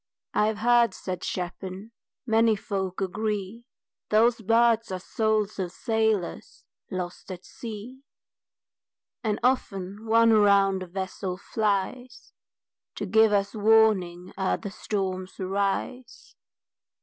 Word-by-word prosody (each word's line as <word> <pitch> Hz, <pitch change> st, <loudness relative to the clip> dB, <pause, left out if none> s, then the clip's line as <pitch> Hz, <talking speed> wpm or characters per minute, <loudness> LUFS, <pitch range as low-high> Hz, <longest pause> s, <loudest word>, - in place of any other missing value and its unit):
"I've 210 Hz, 0 st, +1 dB
heard," 235 Hz, +1 st, +3 dB
said 185 Hz, -1 st, -5 dB
Chapin, 185 Hz, +3 st, -5 dB, 0.3 s
"many 225 Hz, -1 st, +3 dB
folk 195 Hz, -2 st, -4 dB
agree, 210 Hz, +3 st, -3 dB, 0.4 s
Those 230 Hz, +2 st, +3 dB
birds 230 Hz, 0 st, +3 dB
are 185 Hz, -, -2 dB
souls 215 Hz, +1 st, -1 dB
of 180 Hz, -2 st, -2 dB
sailors 220 Hz, -3 st, -1 dB, 0.2 s
lost 180 Hz, 0 st, -5 dB
at 180 Hz, 0 st, -8 dB
sea, 235 Hz, +3 st, -9 dB, 1.2 s
And 215 Hz, -2 st, 0 dB
often 210 Hz, -5 st, -1 dB
one 230 Hz, +1 st, +5 dB
around 200 Hz, -3 st, +4 dB
the 185 Hz, -, -6 dB
vessel 190 Hz, 0 st, -4 dB
flies 215 Hz, +5 st, -2 dB, 0.6 s
To -, -, -4 dB
give 220 Hz, -1 st, +4 dB
us 200 Hz, -1 st, +1 dB
warning 210 Hz, -5 st, +3 dB
ere 190 Hz, -, +1 dB
the 200 Hz, -, -7 dB
storms 190 Hz, -3 st, -4 dB
arise." 200 Hz, +6 st, -3 dB
210 Hz, 110 wpm, -26 LUFS, 190-225 Hz, 1.2 s, one